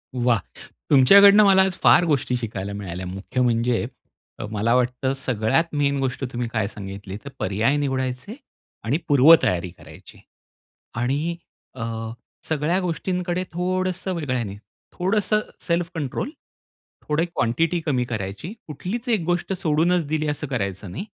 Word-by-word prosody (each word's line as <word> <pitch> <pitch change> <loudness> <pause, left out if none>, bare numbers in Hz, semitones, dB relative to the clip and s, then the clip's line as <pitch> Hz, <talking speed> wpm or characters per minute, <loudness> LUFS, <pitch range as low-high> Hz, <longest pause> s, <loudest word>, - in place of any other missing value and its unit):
वाह! 120 -3 +2 0.5
तुमच्याकडनं 200 +10 +8
मला 190 -1 +6
आज 190 -1 -1
फार - - +7
गोष्टी 140 -5 +1
शिकायला 100 -4 -5
मिळाल्या. 95 -3 -6
मुख्य 95 +7 -3
म्हणजे 120 -1 +1 0.5
अ, - - -4
मला 110 +2 +1
वाटतं 125 +1 0
सगळ्यात 125 +1 +1
मेन 140 -1 +1
गोष्ट 135 0 -2
तुम्ही 120 -1 -3
काय 110 -3 0
सांगितली 100 -1 -8
तर - - -5
पर्याय 110 +9 +1
निवडायचे 130 - -2 0.5
आणि 120 +7 +1
पूर्वतयारी 135 - +5
करायची. 85 - -15 0.8
आणि 140 +8 -1 0.4
अ, 120 - -5 0.7
सगळ्या 160 +4 +1
गोष्टींकडे 180 0 -2
थोडंसं 185 +1 -1
वेगळ्याने, 130 -10 -2 0.4
थोडंसं 210 +3 +1 0.3
सेल्फ 170 0 0
कंट्रोल, 150 - -3 0.8
थोडी 150 +3 +1
क्वांटिटी 165 +2 0
कमी 130 -5 +1
करायची, 105 - -5
कुठलीच 185 - -5
एक 220 -5 +2
गोष्ट 175 +2 -1
सोडूनच 170 0 +1
दिली 155 0 -1
असं 150 0 -3
करायचं 100 -6 -3
नाही. 145 - -5
140 Hz, 130 wpm, -23 LUFS, 115-175 Hz, 0.8 s, तुमच्याकडनं